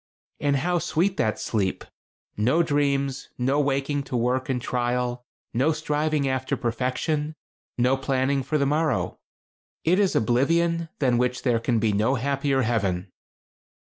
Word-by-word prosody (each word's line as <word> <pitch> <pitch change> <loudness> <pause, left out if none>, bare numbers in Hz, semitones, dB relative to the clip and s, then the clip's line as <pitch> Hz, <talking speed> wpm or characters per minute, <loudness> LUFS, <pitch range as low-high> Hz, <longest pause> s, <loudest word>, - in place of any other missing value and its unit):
"And 145 -1 +1
how 175 +6 +1
sweet 185 +4 0
that 110 0 +1
sleep! 105 -3 -1 0.5
No 130 +11 +3
dreams; 140 -3 0
no 130 +4 +1
waking 140 0 0
to 125 - -2
work 125 +3 0
and 130 -2 0
trial; 125 0 -1 0.3
no 130 +7 +2
striving 150 -1 0
after 130 0 -1
perfection; 130 +5 -1 0.4
no 125 +2 +3
planning 135 +1 0
for 145 +4 -1
the 140 - +2
morrow. 150 +2 0 0.6
It 180 +4 +3
is 200 -3 +2
oblivion 165 +8 +2
than 125 -4 +2
which 125 0 0
there 120 -3 +2
can 115 +1 0
be 110 -1 +1
no 110 +6 +2
happier 140 +1 0
heaven." 100 -5 -1
135 Hz, 140 wpm, -25 LUFS, 120-150 Hz, 0.6 s, No